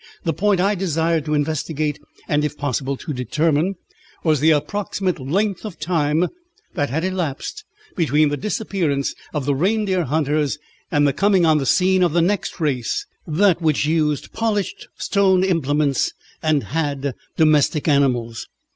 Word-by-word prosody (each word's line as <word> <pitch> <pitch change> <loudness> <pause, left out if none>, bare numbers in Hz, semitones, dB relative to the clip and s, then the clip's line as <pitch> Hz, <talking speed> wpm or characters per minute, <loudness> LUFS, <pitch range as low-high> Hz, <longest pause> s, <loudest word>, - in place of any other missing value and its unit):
The 165 - 0
point 200 +2 +1
I 200 +3 +3
desired 165 -4 0
to 150 -1 0
investigate, 150 0 -1 0.3
and 150 0 +1
if 150 0 -2
possible 140 -1 -2
to 150 - -5
determine, 155 - 0 0.5
was 155 -3 +2
the 155 - +4
approximate 180 +4 0
length 185 +9 -1
of 205 -7 -7
time 155 0 +1 0.5
that 145 - -1
had 155 +6 -1
elapsed 185 - -3 0.3
between 155 -3 +3
the 145 - -1
disappearance 170 -6 -1 0.2
of 150 -4 -3
the 145 - +2
reindeer 190 +3 +1
hunters 150 0 0 0.3
and 145 -1 +3
the 140 - +1
coming 195 +1 +3
on 155 -2 +4
the 135 - -2
scene 185 +4 +3
of 175 -4 +3
the 170 - +3
next 195 +1 -1
race, 135 -7 -1 0.2
that 175 +2 +3
which 155 -3 +2
used 155 -2 0
polished 215 -3 -2
stone 190 -2 +2
implements 150 -6 +1 0.3
and 155 -3 +2
had 145 -3 -2 0.2
domestic 155 -1 +3
animals. 125 -6 +1
155 Hz, 150 wpm, -21 LUFS, 145-185 Hz, 0.5 s, the